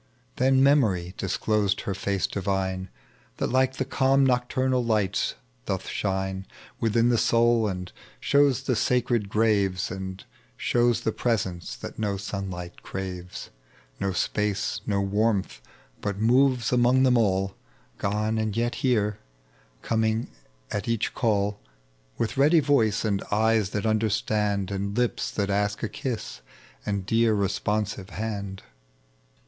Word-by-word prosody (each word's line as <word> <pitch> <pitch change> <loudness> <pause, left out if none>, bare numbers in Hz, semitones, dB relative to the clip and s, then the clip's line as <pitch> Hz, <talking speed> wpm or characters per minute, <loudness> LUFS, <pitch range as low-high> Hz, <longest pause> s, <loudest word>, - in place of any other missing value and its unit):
Then 130 +1 +4
Memory 105 -11 +3
disclosed 100 +1 0
her 100 - -3
face 100 0 -1
divine, 95 -1 -2 0.5
That - - -1
like 130 0 +3
the 130 - -2
calm 135 0 +3
nocturnal 130 0 +1
lights 110 -5 0 0.3
doth - - -2
shine 95 -1 -2 0.3
Within 115 +1 +2
the 120 -2 +3
soul, 115 -1 +3
and 90 -2 -4 0.3
shows 140 -3 +3
the 125 - 0
sacred 120 -3 +1
graves, 100 -4 +1
And 95 0 -6 0.3
shows 120 -1 +2
the 110 - 0
presence 95 -8 -2
that - - -8
no 105 -2 -1
sunlight 95 -3 -6
craves, 90 -2 -6 0.5
No 100 -1 0
space, 105 +2 -1
no 100 -2 +1
warmth, 100 - 0 0.4
but 100 -1 -2
moves 125 +2 +3
among 125 +2 +4
them 130 -1 +4
all; 95 -4 +2 0.5
Gone 105 +2 0
and 110 -1 -2
yet 120 +1 +1
here, 105 -5 +1 0.5
and - - -35
coming 110 0 0 0.4
at 105 +4 -3
each 115 -2 0
call. 105 -4 0 0.6
With 115 - -2
ready 150 +5 +5
voice 115 -8 +2
and 100 -2 0
eyes 110 -1 +2
Uiat 105 +2 -2
understand, 105 -2 0
And 100 +2 -3
lips 120 -1 0
that 100 -1 -1
ask 100 +2 0
a - - +2
Idas, 110 - -5 0.5
and 100 -2 -1
dear 115 +2 +3
responsive 100 0 -1
hand. 100 -2 -5
105 Hz, 130 wpm, -26 LUFS, 100-120 Hz, 0.6 s, ready